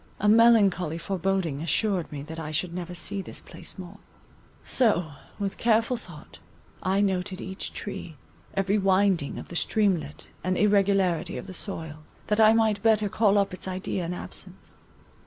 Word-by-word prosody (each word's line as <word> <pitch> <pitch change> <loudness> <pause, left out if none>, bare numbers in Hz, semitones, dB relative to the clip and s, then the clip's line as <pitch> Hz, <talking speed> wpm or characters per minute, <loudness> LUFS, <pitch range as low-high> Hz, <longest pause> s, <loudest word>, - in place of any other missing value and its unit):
A 210 - +1
melancholy 210 -7 +5
foreboding 185 -4 -1
assured 175 +3 0
me 145 -2 -5
that 160 +2 -8
I 155 -2 -5
should 165 +3 -2
never 180 0 -5
see 195 +3 -2
this - - -6
place - - -9
more; 190 +2 -9 0.6
so 180 - +1 0.3
with 200 -2 -3
careful 230 +2 +3
thought, 175 -10 -12 0.4
I 190 +2 +1
noted 185 -2 -1
each 190 +1 -5
tree, 175 -5 -6 0.4
every 195 +2 +2
winding 190 -5 +2
of - - -8
the 175 - -8
streamlet 175 -7 0 0.2
and 185 +1 0
irregularity 195 -3 +2
of - - -6
the 185 - -8
soil, 160 -6 -5 0.3
that 210 +1 +2
I 220 0 +8
might 220 -2 +2
better 215 -2 +3
call 210 -1 +3
up 200 -2 +1
its 185 - -7
idea 185 0 -3
in 170 - -3
absence. - - -8
190 Hz, 160 wpm, -26 LUFS, 175-205 Hz, 0.6 s, I